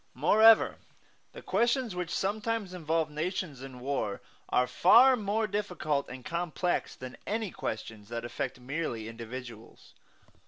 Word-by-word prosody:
Moreover, 215 - +6 0.5
the - - -11
questions 235 +1 +1
which 180 -1 -3
sometimes 210 0 -1
involve 160 -2 -1
nations 155 -2 -3
in 130 -2 -9
war 130 -7 -2 0.3
are 125 - +3
far 245 - +6
more 215 0 0
difficult 180 -8 -2
and 130 -1 -9
complex 175 +1 -1
than 130 -1 -9
any 215 -2 -2
questions 110 -1 -6
that 115 0 -4
affect 120 - -4
merely 125 -4 -3
individuals. 115 0 -9
160 Hz, 125 wpm, -30 LUFS, 125-205 Hz, 0.5 s, Moreover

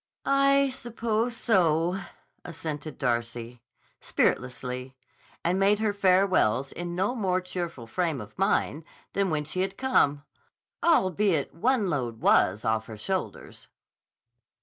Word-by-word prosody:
"I 275 0 +4
suppose 230 -1 -2
so," 175 -4 +2 0.4
assented 155 -3 -6
Darcy, 120 -1 -2 0.4
spiritlessly, 125 +1 -1 0.5
and 180 +3 +2
made 200 +2 +4
her 215 -1 0
farewells 185 - +3
in 175 0 -5
no 190 +6 0
more 190 -6 0
cheerful 175 -8 -5
frame 165 +3 -1
of 105 -2 -10
mind 175 -4 0 0.3
than 200 -1 +1
when 155 -2 0
she 155 +5 -3
had 195 +1 -2
come, 145 - +2 0.6
albeit 190 - +2
one 235 +3 +1
load 125 -9 -2
was 100 -1 +3
off 110 0 0
her 110 - -8
shoulders. 185 - -5
175 Hz, 120 wpm, -27 LUFS, 135-200 Hz, 0.6 s, I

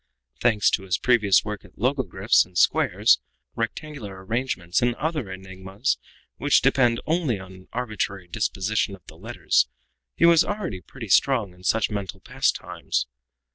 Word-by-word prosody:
Thanks 110 -4 +3
to - - 0
his 95 -2 -1
previous 105 -7 +3
work 105 -1 -5
at - - -19
logogryphs 125 -4 +2
and 90 -1 -11
squares, - - +4 0.4
rectangular 115 -5 -5
arrangements 100 -6 -1
and 120 0 +1
other 150 - -2
enigmas, 95 +4 -3 0.4
which - - +3
depend 120 -3 +3
only 160 - 0
on 95 0 -11
an 95 0 -15
arbitrary 105 -6 -3
disposition 100 +1 -1
of 95 - -22
the - - -13
letters, - - +1 0.5
he - - +4
was 170 -1 +6
already 185 - -4
pretty 115 +5 -10
strong 115 -3 +3
in 90 - -19
such 110 +3 +1
mental 100 -2 -4
pastimes. 65 - -1
105 Hz, 145 wpm, -24 LUFS, 95-125 Hz, 0.5 s, was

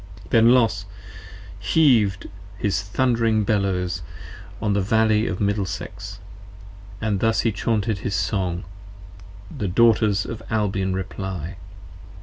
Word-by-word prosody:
p. - - -17
56 - - -25
THEN 115 0 +6
Los 110 -6 +3 0.7
heaved 115 - +3 0.3
his 100 -1 0
thund'ring 115 +1 +1
Bellows 95 -4 0 0.6
on 105 -2 0
the 100 - +1
Valley 110 +2 +2
of - - -3
Middlesex 100 -1 -3 0.8
And 105 -3 -1
thus 115 +1 +2
he 115 - +1
chaunted 105 +1 -1
his 100 0 -3
Song: 90 0 -1 0.9
the 105 - -2
Daughters 110 0 +3
of 115 -1 -6
Albion 95 -3 0
reply. 95 -2 -5
100 Hz, 120 wpm, -23 LUFS, 95-110 Hz, 0.9 s, THEN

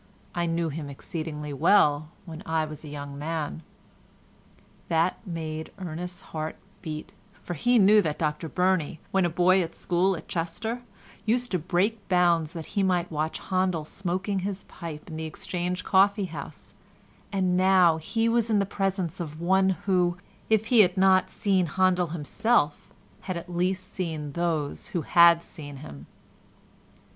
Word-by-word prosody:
I 175 -1 -1
knew 165 0 0
him 150 -1 -5
exceedingly 150 0 -5
well 150 -1 +4 0.2
when 160 -2 -8
I 160 -1 0
was 155 0 -8
a - - -9
young 140 -1 -7
man." 160 0 -3 1.3
That 165 +2 +2
made 160 -2 -5
Ernest's 180 -1 -6
heart 155 0 -5 0.3
beat, 155 -1 -6 0.3
for 175 - -4
he 245 +10 +2
knew 210 0 +7
that 155 -5 -2
Dr 155 0 -2
Burney, 180 -4 +1
when 190 -2 +3
a - - +2
boy 180 +3 +4
at 170 -1 -4
school 180 +1 +1
at - - -11
Chester, 180 +8 -3 0.4
used 245 +2 0
to 180 - +1
break 195 +6 -1
bounds 170 -4 +3
that 165 -3 -6
he 200 - +1
might 180 -2 +1
watch 155 +1 -2
Handel 185 -4 +1
smoking 190 +3 -2
his 195 +1 -3
pipe 160 -4 -8
in 160 -2 -7
the 160 - -4
Exchange 180 +3 -3
coffee 200 +1 +4
house—and 180 +2 -5
now 185 -3 +5
he 225 +8 -1
was 230 0 +2
in 215 - +3
the 200 - +2
presence 190 -3 -2
of 155 -2 -6
one 190 +2 +3 0.2
who, 180 -3 +2 0.3
if 220 -1 +3
he 235 - +7
had 185 -2 +5
not 185 -1 +4
seen 190 -4 +1
Handel 180 +1 +2
himself, 165 +2 0 0.3
had 185 -2 -3
at 175 +1 -8
least 185 +2 -1
seen 160 -5 -3
those 160 -2 -2
who 165 - -1
had 170 -1 +6
seen 145 -5 -9
him. 75 - -10
175 Hz, 155 wpm, -27 LUFS, 160-190 Hz, 1.3 s, knew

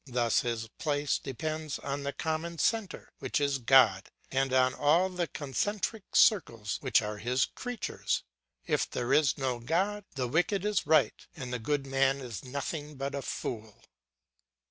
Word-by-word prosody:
Thus 120 -3 +2
his 115 -2 -2
place 145 -2 0
depends 155 +2 -4
on 140 0 -4
the 140 0 -2
common 160 +2 -3
centre, 215 0 -1
which - - -1
is 140 -1 +1
God, 120 -6 +5 0.2
and 135 0 +1
on 130 0 +4
all 165 +6 +3
the 180 -2 -2
concentric 195 - -3
circles 115 - +3
which - - +3
are 105 0 -4
His 125 +3 +1
creatures. 245 -3 -3 0.4
If - - 0
there 125 +2 -1
is 150 -2 +4
no 130 -3 -1
God, 190 - 0
the 130 -2 -1
wicked 180 - +1
is 210 -2 0
right 155 -3 +3
and 125 -4 -6
the 125 - -2
good 140 +4 -1
man 135 0 +2
is 120 -8 -7
nothing 145 +3 -5
but 140 +1 -4
a 140 - -2
fool. 110 -4 -5
140 Hz, 160 wpm, -30 LUFS, 125-160 Hz, 0.4 s, God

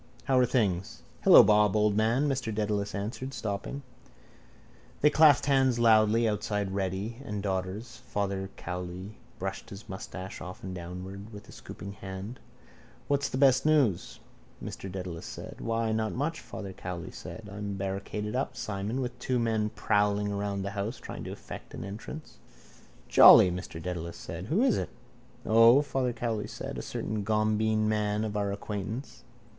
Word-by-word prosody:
How 130 -1 +3
are 125 - +4
things? 100 -8 0 0.2
—Hello, - - +10
Bob, 105 -1 +4
old 105 -1 +3
man, 115 +7 +2
Mr 130 -5 -1
Dedalus 105 -2 -1
answered, 120 +6 -4
stopping. 110 +7 -4 1.2
They 150 - +5
clasped 155 -3 +6
hands 135 -3 +3
loudly 115 0 +5
outside 105 -2 -1
Reddy 95 +4 -2
and 105 -6 -4
Daughter's. 100 +5 -3
Father 100 -3 -3
Cowley 90 +3 -6 0.2
brushed 95 +1 -5
his 100 +1 -10
moustache 95 0 -7
often 90 +1 -7
downward 95 +4 -7
with 105 -1 -11
a - - -13
scooping 100 +3 -9
hand. 95 +4 -7 0.7
—What's 140 0 +1
the - - -3
best 135 -1 +5
news? 145 - +2 0.4
Mr 95 - -7
Dedalus 90 -3 -6
said. - - -8
—Why 115 0 0
then 110 0 +1
not 110 -1 -1
much, 150 +5 -2
Father 100 -4 -7
Cowley 90 -2 -6
said. 110 -2 -9
I'm 100 0 -5
barricaded 100 +3 -3
up, 130 - -2
Simon, 105 +5 -3
with 125 -1 -4
two 125 0 0
men 110 -2 +1
prowling 105 0 +1
around 100 -1 -2
the 100 - -3
house 105 +4 -3
trying - - -8
to - - -5
effect - - -9
an - - -6
entrance. 110 +10 -8 0.7
—Jolly, 90 - +9
Mr 90 -2 -6
Dedalus 85 0 -5
said. 85 +3 -7
Who 195 - +2
is 270 - +3
it? - - -3 0.6
—O, 115 +5 +7
Father 130 -3 -1
Cowley 115 -2 -2
said. - - -6
A - - -4
certain 105 -1 -3
gombeen 110 +1 +1
man 105 0 0
of 105 -1 -4
our 100 -1 0
acquaintance. 105 +5 -5
105 Hz, 160 wpm, -29 LUFS, 95-115 Hz, 1.2 s, Hello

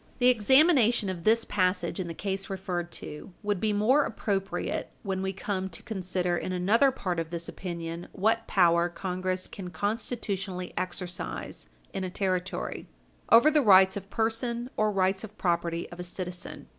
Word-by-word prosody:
The 250 -1 +5
examination 245 - +5
of 175 -3 -5
this 225 +1 +4
passage 180 -3 0
in 185 - -2
the 165 - -6
case 195 +1 -3
referred 180 -3 -3
to 150 +5 -8
would 205 -2 0
be 215 +2 +1
more 230 +8 +4
appropriate 200 -5 -2
when 190 -2 -2
we 190 0 -1
come 190 0 -3
to 165 - -9
consider 180 -4 -1
in 185 - -3
another 205 +9 +4
part 185 -9 -2
of 165 -1 -3
this 170 0 -4
opinion 170 -1 -5
what 225 +3 +1
power 170 -2 +4
Congress 185 +1 -2
can 185 -3 -7
constitutionally 195 -1 -3
exercise 180 0 -5 0.2
in 195 - -3
a 185 - -2
Territory, 185 -1 -2 0.4
over 235 +7 +7
the 300 -1 +4
rights 190 -5 +7
of 200 -1 -6
person 235 +3 -1
or 215 0 +2
rights 190 0 +1
of 215 -1 -10
property 170 -1 0
of 175 - -10
a - - -3
citizen. 180 0 -6
190 Hz, 165 wpm, -28 LUFS, 180-215 Hz, 0.4 s, over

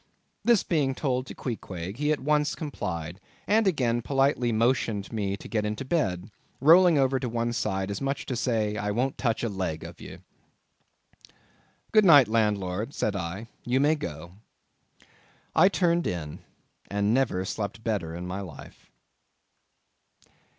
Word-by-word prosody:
This 235 -4 +4
being 145 -6 0
told 130 -2 -1
to - - -8
Queequeg, 95 -5 -5
he 150 +2 +1
at 155 - +1
once 150 +1 +1
complied, 90 - -5 0.3
and 215 0 +3
again 120 -9 +1
politely 135 -2 +1
motioned 115 -2 0
me 100 -3 -2
to - - -11
get 105 0 -1
into 105 +5 -3
bed—rolling 150 - +3
over 135 -1 +2
to 125 - -3
one 120 0 -1
side 95 -3 -2
as 100 - -4
much 135 +1 -1
as - - -9
to 130 - -3
say—"I 105 -4 -1
won't 125 +6 -1
touch 115 -3 0
a - - +1
leg 95 -6 -3
of - - -10
ye." - - -9 1.7
"Good 215 -1 +6
night, 145 - +8
landlord," 105 +1 0
said 105 - -1
I, 95 +4 -4 0.2
"you 125 +2 +1
may 145 +3 +4
go." 85 - -6 1.2
I 185 - +6
turned 175 -3 +1
in, 80 -4 -4 0.5
and 100 +1 +1
never 120 -8 +1
slept 105 +2 -4
better 95 -8 -2
in 90 +1 -6
my 90 +2 -4
life. 85 -7 -11
115 Hz, 150 wpm, -27 LUFS, 100-135 Hz, 1.7 s, night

